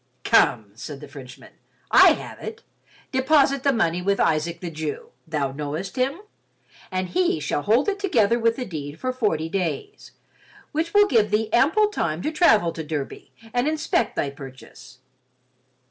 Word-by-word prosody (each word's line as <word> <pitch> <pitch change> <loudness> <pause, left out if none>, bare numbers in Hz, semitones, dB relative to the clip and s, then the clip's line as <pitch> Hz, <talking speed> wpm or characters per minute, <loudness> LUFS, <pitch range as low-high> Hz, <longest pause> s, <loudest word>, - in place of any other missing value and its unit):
"Come," 105 -2 +3
said 135 +6 -8
the 150 - -10
Frenchman, 135 -3 -12 0.4
"I - - +8
have - - -9
it. 445 0 -8 0.5
Deposit 275 0 +3
the 275 - +3
money 180 -8 0
with 200 +2 0
Isaac 165 +2 0
the 175 -2 -6
Jew—thou 155 -1 -4
knowest 150 +6 -5
him?—and 255 - -5
he 355 - +1
shall 145 0 -2
hold 225 - +2
it 405 0 -1
together 235 - +2
with 230 0 +2
the 255 - -4
deed 150 -4 -7
for 255 0 -2
forty 205 -11 0
days, 195 - -4 0.6
which 330 +5 -2
will 410 0 +7
give 220 - +3
thee 215 +1 -1
ample 415 - +4
time 170 - -2
to 310 - -1
travel 220 - +4
to 165 - -6
Derby 150 -3 -6 0.2
and 245 +3 +1
inspect 315 +4 0
thy 140 - -1
purchase. 130 -2 -13
200 Hz, 155 wpm, -23 LUFS, -, 0.6 s, I